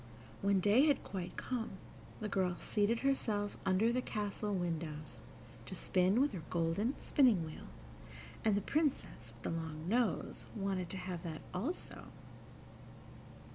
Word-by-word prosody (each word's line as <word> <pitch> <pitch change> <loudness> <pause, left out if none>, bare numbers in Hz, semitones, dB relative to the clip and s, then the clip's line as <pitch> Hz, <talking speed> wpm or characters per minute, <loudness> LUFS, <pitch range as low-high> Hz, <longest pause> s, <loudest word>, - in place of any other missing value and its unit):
When 200 -1 +4
day 210 - +5
had 285 -3 +3
quite 180 -3 -5
come, 230 -4 -2 0.5
the 215 - -1
girl 185 -3 +1
seated 215 +2 +1
herself 215 -7 +1
under 210 +5 +4
the 255 - +2
castle 210 -2 -2
windows, 160 -5 -3 0.5
to - - -5
spin 185 +5 +3
with 285 +2 +4
her 185 - -5
golden 175 +9 +1
spinning 235 - +4
wheel, 155 - -8 0.8
and 215 -2 +4
the 205 - +2
Princess 270 - -1
with 115 0 -17
the - - -1
long 160 0 -6
nose 235 +3 0
wanted 195 -4 -1
to 190 - -5
have 180 -2 -4
that 160 -3 -6
also. 250 - -3
200 Hz, 140 wpm, -35 LUFS, 175-230 Hz, 0.8 s, day